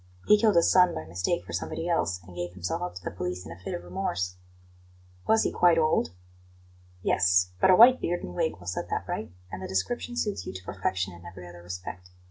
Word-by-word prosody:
He 210 - +7
killed 215 -4 +4
his 170 - +5
son 180 -1 +5
by 80 - -5
mistake 85 +1 -2
for 85 - -8
somebody 165 - -3
else, 95 - 0
and 90 0 -14
gave 90 0 -4
himself 90 -1 -3
up 90 0 -4
to 90 - -9
the - - -4
police 90 +1 -4
in 80 - -9
a 85 - -10
fit 95 - -5
of 85 - -7
remorse." 90 0 -2 0.9
"Was 220 0 +4
he - - 0
quite 175 -2 +4
old?" 155 - +2 0.9
"Yes; 90 0 +3
but - - +5
a 185 - +8
white 250 +5 +8
beard 175 +1 -1
and 90 - -6
wig 85 -2 -1
will 90 - -14
set 90 - -3
that - - -2
right, - - -4 0.2
and 95 - -6
the - - -5
description 240 - -2
suits 210 -4 -1
you - - -6
to 95 - -7
perfection 95 -1 -2
in 85 0 -13
every 90 0 -10
other 85 0 -12
respect. 90 +1 -8
90 Hz, 230 wpm, -27 LUFS, -, 0.9 s, a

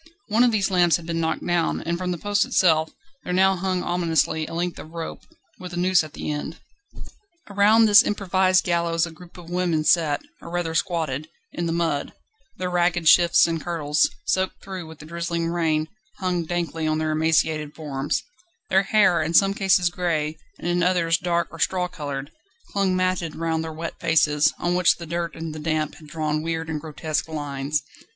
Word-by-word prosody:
One 225 +3 +4
of 245 - +4
these 200 -3 +1
lamps 175 -2 +4
had 170 - -5
been 165 0 -2
knocked 160 -1 -1
down, 175 -1 0
and 170 +1 -2
from 180 +1 -3
the 175 - -2
post 205 +4 +1
itself 160 -10 +3 0.3
there - - -4
now 190 +1 +4
hung 185 0 -1
ominously 165 -3 0
a - - -8
length 175 +1 -2
of - - -10
rope, 165 0 -6 0.4
with 180 -1 -8
a - - -4
noose 180 -1 +3
at 155 -2 -10
the - - -4
end. 150 +2 -5 0.9
Around 210 +3 +5
this 210 0 +8
improvised 185 -3 +2
gallows 170 -1 +1
a 170 - -8
group 175 +3 -15
of 175 -1 -11
women 175 -3 0
sat, 155 -3 +2 0.2
or - - -9
rather 175 -1 -2
squatted, 160 -5 -1 0.2
in 170 - -3
the - - -1
mud; 165 -4 -1 0.4
their 180 -1 -3
ragged 175 -1 +1
shifts 170 +2 +6
and 165 -1 -2
kirtles, 150 -4 +1 0.2
soaked 190 0 -1
through 185 -4 -7
with 160 -1 -11
the 155 - -12
drizzling 170 0 -3
rain, 160 -2 0 0.3
hung 180 -3 -1
dankly 165 -2 -2
on 155 - +1
their 155 0 -1
emaciated 155 -1 +1
forms; 145 -3 -2 0.5
their 190 - +5
hair, 200 -4 +3
in 160 +2 -1
some 195 +2 +5
cases 190 -3 +2
grey, 160 -4 -1 0.2
and - - -6
in 175 0 +1
others 170 -2 +2
dark 170 -1 0
or 165 - -11
straw 180 +2 +1
coloured, 145 -4 -6 0.4
clung 195 -2 +1
matted 185 -3 -1
round 160 0 -1
their 160 - -5
wet 165 +1 -5
faces, 155 -2 +3
on 175 - -1
which 180 -1 +4
the 170 - -8
dirt 170 0 -3
and 160 -1 -6
the 155 - -7
damp 155 -1 -1
had 155 - -14
drawn 155 -1 -2
weird 160 0 -3
and 155 -2 -3
grotesque 155 0 -3
lines. 145 -2 -3
170 Hz, 195 wpm, -23 LUFS, 155-180 Hz, 0.9 s, this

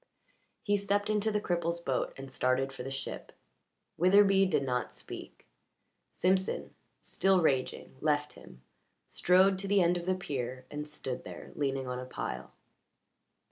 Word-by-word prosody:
He 205 0 +2
stepped 205 +1 0
into 215 +1 +2
the 210 - +1
cripple's 170 -3 -1
boat 135 -6 -1
and 135 0 -8
started 130 +1 +1
for - - -7
the 130 - -5
ship. 135 0 -5 0.7
Witherbee 195 +1 +6
did 140 - +2
not 125 -2 -1
speak; - - -10 0.6
Simpson, 190 +1 0 0.3
still 190 -1 +2
raging, 135 -5 0
left 150 -1 +1
him, 65 +1 -15 0.4
strode 190 +1 +4
to 200 - -3
the 200 0 +4
end 175 0 +3
of 175 0 -6
the 185 - +2
pier, 130 -7 -4
and 150 0 -4
stood 135 -4 -5
there, - - -9
leaning 135 -2 -1
on 125 0 -3
a 130 - -5
pile. 130 - -5
170 Hz, 150 wpm, -31 LUFS, 135-190 Hz, 0.7 s, Witherbee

